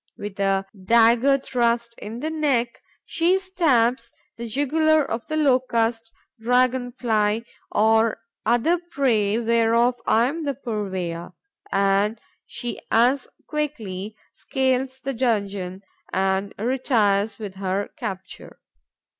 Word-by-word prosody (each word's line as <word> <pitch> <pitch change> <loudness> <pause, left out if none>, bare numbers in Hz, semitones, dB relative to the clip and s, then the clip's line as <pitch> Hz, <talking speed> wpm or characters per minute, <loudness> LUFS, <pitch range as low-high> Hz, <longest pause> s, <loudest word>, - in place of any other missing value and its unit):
With 205 -1 -7
a 195 0 +1 0.2
dagger 235 +6 +5
thrust 235 -3 0
in 225 +3 -7
the 315 - -2
neck, 270 -7 0 0.2
she 345 +3 +2
stabs 305 -11 +1 0.2
the 235 0 -6
jugular 305 +5 +2
of 230 -2 -4
the 310 - -2
Locust, 235 -5 +1 0.3
Dragon 245 +1 +2
fly 220 -2 0 0.3
or 220 +1 +3 0.3
other 240 +10 +2
prey 245 - +1
whereof 235 +1 +3
I 230 +2 +4
am 315 +6 -3
the 280 -2 -2
purveyor; 190 -8 -4 0.4
and 200 +2 +2 0.3
she 240 -1 -5
as 250 +4 +3 0.2
quickly 220 -10 -4 0.2
scales 260 0 -1
the 275 +1 -3
donjon 200 -6 -1 0.3
and 190 +1 0
retires 220 -4 +1
with 205 -4 -7
her 195 +1 -2
capture. 195 -5 -7
235 Hz, 115 wpm, -23 LUFS, 210-260 Hz, 0.4 s, dagger